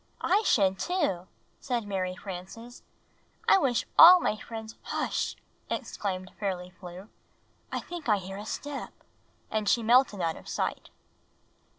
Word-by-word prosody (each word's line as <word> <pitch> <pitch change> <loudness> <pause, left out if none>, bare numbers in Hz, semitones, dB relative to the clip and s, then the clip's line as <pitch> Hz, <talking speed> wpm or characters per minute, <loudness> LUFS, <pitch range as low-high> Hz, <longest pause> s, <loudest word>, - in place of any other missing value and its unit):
"I 415 - +3
should, 195 - +3
too," 290 - -1 0.3
said 240 -5 -2
Mary 185 -2 -2
Frances. 195 +6 -9 0.7
''I 385 - +6
wish 250 -5 +1
all 360 +2 +11
my 215 - 0
friends 220 +1 -8
" - - -37
"Hush!" - - -1 0.3
exclaimed 185 -2 -4
Fairly 180 -3 -3
Flew. 180 +1 -11 0.6
"I - - -2
think 340 -7 -6
I 210 - +5
hear 195 0 -7
a 205 - -7
step!" 290 +3 -5 0.6
And 215 -1 0
she 235 - +3
melted 235 -2 +4
out 165 -2 -1
of - - -12
sight. - - -3
210 Hz, 145 wpm, -28 LUFS, 185-245 Hz, 0.7 s, all